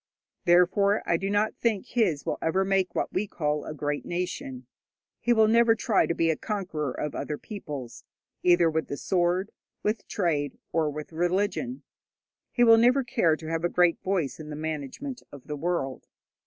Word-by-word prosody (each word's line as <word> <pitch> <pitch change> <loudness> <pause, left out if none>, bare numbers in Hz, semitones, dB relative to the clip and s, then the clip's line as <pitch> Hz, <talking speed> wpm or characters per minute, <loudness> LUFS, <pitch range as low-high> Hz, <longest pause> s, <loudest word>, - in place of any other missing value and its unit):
Therefore 185 +4 +4
I 170 - +3
do 195 +4 -2
not 205 +1 +1
think 220 -5 0
his 185 - 0
will - - -2
ever 190 +4 +1
make 195 -1 +1
what - - -1
we 200 +3 0
call 150 -4 -1
a - - -5
great 145 0 -2
nation. 155 -8 -4 0.5
He 240 - 0
will 220 -2 +5
never 230 0 +5
try 225 -3 +2
to 170 - -1
be 165 -1 +2
a - - 0
conqueror 170 - -3
of 150 +3 -4
other 150 - -3
peoples, 145 - -8 0.4
either 175 -1 +5
with 160 0 -1
the 140 - -4
sword, 180 +3 0 0.3
with 210 0 -1
trade, 155 -7 -1
or 160 -2 +1
with 150 +2 -7
religion. 200 +9 -1 0.7
He 245 - +3
will 230 -1 +8
never 250 +4 +4
care 225 -10 +2
to 160 0 -10
have 165 0 -1
a 175 - +2
great 175 -1 +3
voice 185 -8 -1
in 155 -1 -8
the 150 - -5
management 160 - -5
of 140 -3 -12
the 150 - -4
world. 145 -4 -2
175 Hz, 180 wpm, -27 LUFS, 150-205 Hz, 0.7 s, will